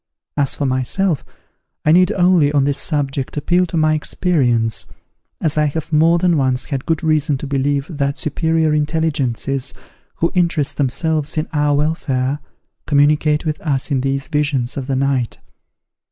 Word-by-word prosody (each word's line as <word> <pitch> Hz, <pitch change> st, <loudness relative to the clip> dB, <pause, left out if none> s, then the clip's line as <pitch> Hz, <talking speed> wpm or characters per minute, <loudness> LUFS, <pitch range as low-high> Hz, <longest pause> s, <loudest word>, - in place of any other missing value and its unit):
As 140 Hz, -2 st, +1 dB
for 145 Hz, -, -2 dB
myself, 135 Hz, +6 st, 0 dB, 0.6 s
I 155 Hz, -, +5 dB
need 180 Hz, +2 st, +5 dB
only, 175 Hz, -5 st, +3 dB
on 145 Hz, -2 st, +2 dB
this 140 Hz, 0 st, 0 dB
subject, 140 Hz, -3 st, -2 dB
appeal 175 Hz, +5 st, +2 dB
to 165 Hz, -, -3 dB
my 155 Hz, -1 st, +3 dB
experience, 130 Hz, -, 0 dB, 0.5 s
as 155 Hz, -2 st, 0 dB
I 150 Hz, -, +3 dB
have 155 Hz, +2 st, -3 dB
more 165 Hz, +3 st, +5 dB
than 175 Hz, -1 st, +2 dB
once 130 Hz, -2 st, +1 dB
had 135 Hz, -3 st, -4 dB
good 165 Hz, -1 st, 0 dB
reason 155 Hz, -2 st, +1 dB
to 140 Hz, -, -6 dB
believe 140 Hz, 0 st, 0 dB
that 140 Hz, -4 st, -2 dB
superior 160 Hz, 0 st, 0 dB
intelligences, 145 Hz, -4 st, -1 dB, 0.4 s
who 165 Hz, -, 0 dB
interest 170 Hz, -5 st, 0 dB
themselves 150 Hz, +3 st, -1 dB
in 155 Hz, -, 0 dB
our 145 Hz, -1 st, +2 dB
welfare, 145 Hz, -3 st, -1 dB, 0.5 s
communicate 150 Hz, +2 st, +3 dB
with 155 Hz, -1 st, -2 dB
us 145 Hz, -2 st, -2 dB
in 135 Hz, -2 st, +1 dB
these 135 Hz, +1 st, -2 dB
visions 140 Hz, -4 st, -1 dB
of 135 Hz, -2 st, -4 dB
the 135 Hz, -, 0 dB
night. 130 Hz, -3 st, 0 dB
150 Hz, 155 wpm, -18 LUFS, 135-160 Hz, 0.6 s, I